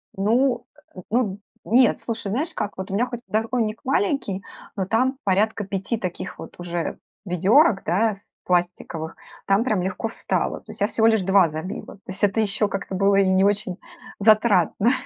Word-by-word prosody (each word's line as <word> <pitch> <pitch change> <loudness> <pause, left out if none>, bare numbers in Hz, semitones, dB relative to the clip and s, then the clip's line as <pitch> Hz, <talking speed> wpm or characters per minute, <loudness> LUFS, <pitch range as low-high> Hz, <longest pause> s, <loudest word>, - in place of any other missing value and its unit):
Ну 240 +6 +1 0.3
э, - - -8
ну 210 -4 0 0.3
нет, 240 +1 +4
слушай, 225 -3 -4
знаешь 295 +9 -1
как? 205 - -4
Вот 190 0 -5
у - - -4
меня 235 +5 +2
хоть 240 -1 -7
подоконник 225 0 -1
маленький, 275 - 0 0.3
но 190 - -1
там 255 +7 +1
порядка 205 +2 +1
5 195 +4 -2
таких 185 -5 -5
вот - - -10
уже 175 -1 -4 0.3
ведерок, 195 - +4
да, 215 +3 +2
с 200 - -25
пластиковых, 175 -2 -1 0.3
там 195 +3 +3
прям 215 -7 0
легко 190 +4 -3
встало. - - -2
То - - -11
есть - - -9
я 205 - +4
всего 225 -1 +2
лишь 220 -3 +4
2 190 -1 +5
забила. 160 +7 -6
То 195 - -24
есть 190 +3 -6
это 205 +2 +3
еще 210 0 +1
как-то 195 -1 -4
было 195 +1 +3
и 195 -1 +4
не 190 0 +3
очень 200 -2 0 0.4
затратно. 215 0 +4
205 Hz, 180 wpm, -23 LUFS, 190-230 Hz, 0.4 s, 2